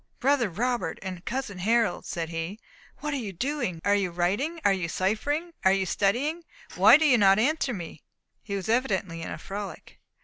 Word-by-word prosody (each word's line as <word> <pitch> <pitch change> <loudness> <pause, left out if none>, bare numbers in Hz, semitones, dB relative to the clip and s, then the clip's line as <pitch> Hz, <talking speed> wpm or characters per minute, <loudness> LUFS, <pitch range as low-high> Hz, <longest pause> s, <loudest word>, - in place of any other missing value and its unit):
"Brother 260 -4 +2
Robert 240 +7 -1
and 185 -2 -6
cousin 235 -7 -4
Harold," 225 0 +1
said 165 -2 -3
he, 165 +5 -4 0.4
"what 300 -1 -2
are - - 0
you 220 -6 -4
doing? 240 - -2
Are 200 - +4
you 200 -3 +1
writing? 200 - -1
are 200 - +5
you 185 -3 -2
ciphering? 290 - -1
are 190 - +5
you 195 0 +1
studying? 265 - 0 0.3
Why - - +8
do 315 - +1
you 255 -5 +5
not 195 -1 +6
answer 275 +4 +1
me?" 170 -7 -7 0.4
He 200 - -5
was 195 -2 -4
evidently 200 -8 0
in - - -5
a - - -5
frolic. 200 +1 -8
205 Hz, 190 wpm, -27 LUFS, 185-265 Hz, 0.4 s, Why